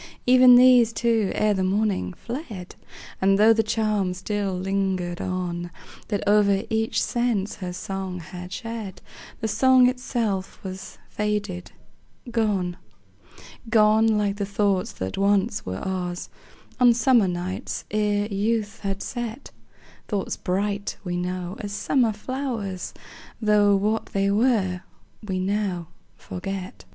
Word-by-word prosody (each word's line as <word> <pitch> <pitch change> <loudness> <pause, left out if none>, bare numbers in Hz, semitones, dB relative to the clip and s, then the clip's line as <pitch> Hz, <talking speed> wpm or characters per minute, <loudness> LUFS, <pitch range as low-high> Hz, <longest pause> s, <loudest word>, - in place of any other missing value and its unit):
Even 255 0 +8
these, 245 -2 +7
too, 225 -3 +1
ere 210 0 +2
the 190 -1 0
morning, 200 +1 0
fled; 225 - -7 0.5
And, 195 +1 +4
tho' 220 +2 +6
the 225 - +2
charm 215 -4 0
still 195 0 -2
lingered 190 -2 -1
on, 175 -1 -3 0.4
That 205 -3 -2
o'er 200 -1 +4
each 220 +1 +1
sense 235 -5 0
her 180 -2 -5
song 190 0 -5
had 180 +2 -9
shed, 225 -5 -6 0.4
The 220 - 0
song 255 +4 +5
itself 230 -6 -2
was 190 -1 -7
faded, 205 -4 -2 0.6
gone; 200 -6 0 0.9
Gone, 220 0 +4
like 205 -1 0
the 205 - -1
thoughts 200 -2 0
that 95 - -4
once 200 - +1
were 95 0 -3
ours, 180 - -4 0.5
On 245 -2 +6
summer 235 -3 +4
days, 180 +1 -4
ere 210 -1 +1
youth 210 +1 -1
had 195 -1 -3
set; 240 +1 -5 0.6
Thoughts 205 -3 -2
bright, 200 +2 -2
we 175 -2 -3
know, 180 0 -3
as 205 -2 -5
summer 240 +2 +2
flowers, 220 -4 -4 0.4
Tho' 210 -2 +4
what 210 +3 0
they 195 0 0
were 205 -5 +2 0.4
we 190 -3 -3
now 185 -3 -1 0.3
forget. 190 - -6
205 Hz, 125 wpm, -24 LUFS, 185-220 Hz, 0.9 s, Even